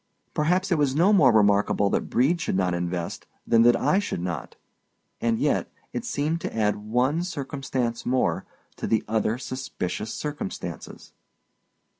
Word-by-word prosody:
Perhaps 180 Hz, +6 st, +1 dB
it 170 Hz, -, +3 dB
was 140 Hz, -2 st, +2 dB
no 180 Hz, +7 st, +4 dB
more 145 Hz, -11 st, +6 dB
remarkable 100 Hz, -2 st, +3 dB
that -, -, -1 dB
Brede 150 Hz, +8 st, +2 dB
should -, -, -1 dB
not 90 Hz, -2 st, +1 dB
invest 85 Hz, 0 st, -3 dB, 0.2 s
than 115 Hz, -1 st, +4 dB
that 120 Hz, +1 st, +6 dB
I 190 Hz, -, +3 dB
should 205 Hz, -, -3 dB
not—and 90 Hz, -, -5 dB
yet, 145 Hz, +3 st, 0 dB, 0.2 s
it 240 Hz, -, -3 dB
seemed 165 Hz, -6 st, -1 dB
to -, -, -5 dB
add 105 Hz, -2 st, +2 dB
one 125 Hz, +10 st, 0 dB
circumstance 135 Hz, -7 st, -3 dB
more 130 Hz, +1 st, +1 dB, 0.3 s
to -, -, -3 dB
the 110 Hz, -, +2 dB
other 110 Hz, +1 st, 0 dB
suspicious 110 Hz, -6 st, -4 dB
circumstances. 150 Hz, -8 st, -6 dB
125 Hz, 145 wpm, -25 LUFS, 105-150 Hz, 0.3 s, more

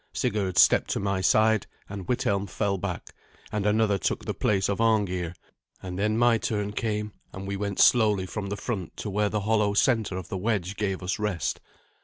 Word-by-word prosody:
Sigurd 95 Hz, -4 st, -1 dB
stepped -, -, +5 dB
to -, -, 0 dB
my 100 Hz, -1 st, -1 dB
side, 110 Hz, +2 st, +3 dB, 0.2 s
and 100 Hz, -2 st, -7 dB
Withelm 100 Hz, -5 st, 0 dB
fell 100 Hz, 0 st, -1 dB
back, 90 Hz, -2 st, -5 dB, 0.4 s
and 105 Hz, -1 st, -1 dB
another 105 Hz, -1 st, +2 dB
took -, -, -2 dB
the -, -, -2 dB
place 100 Hz, -2 st, +1 dB
of 100 Hz, +2 st, -1 dB
Arngeir, 95 Hz, -6 st, +1 dB, 0.5 s
and 90 Hz, 0 st, -5 dB
then 105 Hz, +2 st, +1 dB
my 120 Hz, -1 st, +4 dB
turn 105 Hz, -2 st, -2 dB
came, 105 Hz, -1 st, -2 dB, 0.2 s
and 95 Hz, +1 st, -7 dB
we 100 Hz, -, -2 dB
went 100 Hz, 0 st, -3 dB
slowly 105 Hz, -6 st, +4 dB
from 100 Hz, +1 st, -5 dB
the 100 Hz, -, -3 dB
front 100 Hz, -9 st, -4 dB
to 105 Hz, -, -4 dB
where 105 Hz, +1 st, +1 dB
the 105 Hz, 0 st, -1 dB
hollow 105 Hz, -1 st, +1 dB
centre 110 Hz, -5 st, +2 dB
of 95 Hz, -, -6 dB
the 95 Hz, -, -4 dB
wedge 100 Hz, -2 st, -1 dB
gave 95 Hz, -3 st, -2 dB
us 90 Hz, +3 st, -2 dB
rest. 105 Hz, -5 st, -2 dB
100 Hz, 195 wpm, -26 LUFS, 95-110 Hz, 0.5 s, stepped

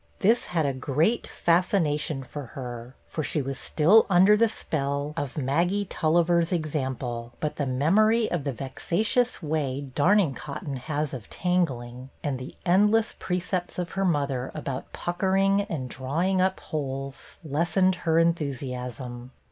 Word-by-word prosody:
'f -, -, -18 dB
his 225 Hz, +5 st, +4 dB
had 165 Hz, -4 st, 0 dB
a 140 Hz, -, 0 dB
great 150 Hz, -, 0 dB
fascination 160 Hz, -5 st, +1 dB
for 140 Hz, 0 st, -7 dB
her, 120 Hz, -1 st, -7 dB
for 155 Hz, -, -3 dB
she 155 Hz, -, -1 dB
Was 135 Hz, -1 st, -3 dB
still 185 Hz, +9 st, +4 dB
under 190 Hz, +3 st, +6 dB
the 225 Hz, +1 st, +3 dB
spell 140 Hz, -5 st, -2 dB
of 145 Hz, -3 st, -4 dB
Maggie 170 Hz, +9 st, +1 dB
Tulliver's 170 Hz, 0 st, +2 dB
i8 -, -, -5 dB
BETTY 180 Hz, -, +2 dB
BAIRD 155 Hz, -, -4 dB
example; 130 Hz, -5 st, -3 dB
but 150 Hz, -, -3 dB
the 145 Hz, -, -1 dB
memory 215 Hz, -, +3 dB
of 175 Hz, -5 st, -1 dB
the 140 Hz, -, -1 dB
vexatious 180 Hz, -, 0 dB
way 145 Hz, -3 st, -2 dB
darning 175 Hz, +1 st, +3 dB
cotton 140 Hz, 0 st, -6 dB
has 150 Hz, +2 st, -3 dB
of 120 Hz, -6 st, -7 dB
tangling, 130 Hz, -9 st, -1 dB
and 140 Hz, -3 st, -2 dB
the 130 Hz, -, -8 dB
endless 210 Hz, +5 st, +3 dB
precepts 180 Hz, 0 st, -2 dB
of 180 Hz, -1 st, -3 dB
her 195 Hz, -, -1 dB
mother 140 Hz, -7 st, 0 dB
about 140 Hz, -4 st, -5 dB
puck 175 Hz, 0 st, -4 dB
ering 195 Hz, +1 st, +3 dB
and 135 Hz, -6 st, -3 dB
drawing 160 Hz, +10 st, 0 dB
up 190 Hz, 0 st, +1 dB
holes, 135 Hz, -2 st, -5 dB
lessened 170 Hz, +6 st, +2 dB
her 160 Hz, -1 st, +2 dB
enthusiasm. 125 Hz, -6 st, -2 dB
155 Hz, 155 wpm, -26 LUFS, 135-180 Hz, -, under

